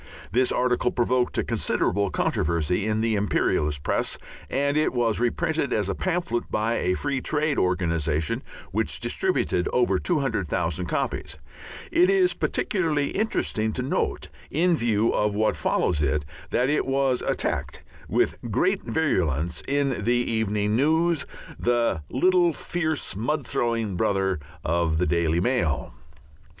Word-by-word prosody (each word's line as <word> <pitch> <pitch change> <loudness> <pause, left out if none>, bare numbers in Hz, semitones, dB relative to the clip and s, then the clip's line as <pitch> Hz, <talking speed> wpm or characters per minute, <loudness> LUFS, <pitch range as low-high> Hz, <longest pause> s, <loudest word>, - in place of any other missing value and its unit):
This 125 +5 +2
article 125 0 +1
provoked 125 0 0
a - - +2
considerable 100 -1 0
controversy 85 +4 0
in 110 0 0
the 115 0 +1
imperialist 75 -8 0
press, - - -1 0.3
and 140 +2 0
it 155 -2 +2
was 115 -3 +1
reprinted 140 +4 0
as 105 -3 0
a - - 0
pamphlet 175 - -2
by 110 +2 0
a 90 +1 +1
Free 140 +1 -2
Trade 150 +1 0
organization, 85 -4 0 0.3
which - - 0
distributed 90 - 0
over 95 -7 +2
200,000 90 - -1
copies. - - -3 0.5
It 345 +2 +4
is 380 -2 +4
particularly 155 -7 0
interesting 110 - 0
to 125 - -2
note, 130 - -1 0.2
in 175 +4 +2
view 115 -4 +1
of 105 -1 +1
what 110 +1 +2
follows 75 -4 0
it, 75 +1 0 0.2
that 125 - +1
it 150 0 +1
was 135 -1 +1
attacked - - -2 0.3
with - - +1
great 185 - +1
virulence 85 - 0
in 140 -5 0
the 120 +3 +2
Evening 110 -3 0
News, 160 +3 +2 0.3
the 120 -8 +1
little 175 +4 +3
fierce 160 - -2
mud 140 +7 -1
throwing 115 -5 -1
brother 95 -2 +1 0.3
of 85 -1 +1
the 90 - +2
Daily 85 -1 +1
Mail. 85 - 0
115 Hz, 135 wpm, -25 LUFS, 90-145 Hz, 0.5 s, It